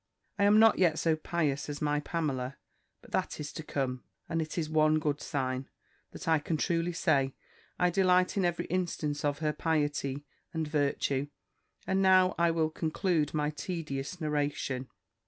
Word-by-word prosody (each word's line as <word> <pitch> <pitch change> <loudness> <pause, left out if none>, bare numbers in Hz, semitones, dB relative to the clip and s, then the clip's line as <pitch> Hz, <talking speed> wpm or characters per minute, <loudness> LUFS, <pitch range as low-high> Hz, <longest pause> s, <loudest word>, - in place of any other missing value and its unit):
I 200 - +4
am 205 +1 +6
not 225 0 +6
yet 170 -4 +4
so 165 -1 +2
pious 150 -3 -1
as 145 0 -4
my 150 0 +1
Pamela; 140 -5 -2 0.5
but - - -16
that - - -1
is 150 -1 -5
to - - -5
come; 130 -4 -3 0.2
and 165 -1 -1
it 155 +2 -5
is 160 -2 0
one 155 0 +3
good 150 -1 -1
sign, 130 -1 -2 0.4
that - - -10
I 160 -1 +4
can 160 +2 -2
truly 170 +1 0
say, 140 -5 +1 0.4
I 180 0 +3
delight 185 0 +3
in 195 - +1
every 175 -1 0
instance 165 -5 -2
of 145 -1 +1
her 150 - +2
piety 145 -3 -1 0.3
and 160 -1 -1
virtue: 145 -2 0 0.6
and 190 0 +1
now 185 -1 +5
I 170 0 +4
will 160 -1 +1
conclude 160 -1 0
my 150 0 +1
tedious 150 0 -4
narration." 145 -4 -2
155 Hz, 170 wpm, -30 LUFS, 145-170 Hz, 0.6 s, am